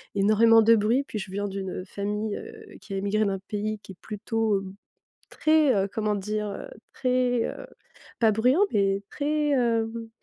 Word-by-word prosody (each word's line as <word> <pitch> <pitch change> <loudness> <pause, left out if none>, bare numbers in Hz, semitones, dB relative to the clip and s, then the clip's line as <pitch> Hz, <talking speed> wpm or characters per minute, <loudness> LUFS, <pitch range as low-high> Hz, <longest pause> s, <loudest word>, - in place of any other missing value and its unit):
énormément 215 +3 +5
de 230 +1 +6
bruit, 225 +6 +2
puis 215 - -4
je 195 0 -6
viens 205 +1 -2
d'une, 190 -1 -5
heu, 185 - -5
famille, 210 +2 -3
heu, - - -11
qui 200 - -9
a - - -2
émigré 200 +2 +1
d'un 195 -1 -1
pays 215 0 -2
qui - - -11
est - - -23
plutôt, 220 -1 -1
hem, 190 0 -9 0.5
très, 310 -3 +3
heu, 195 0 +1
comment 215 -1 0
dire? 210 +1 -3
Heu, 350 - -7 0.3
très, 250 -2 +1
heu, - - -6 0.6
pas 225 -2 +5
bruyant, 250 - +3
mais 195 -1 +1
très, 300 +1 -1
hem, 230 -3 0
215 Hz, 180 wpm, -26 LUFS, 200-230 Hz, 0.6 s, de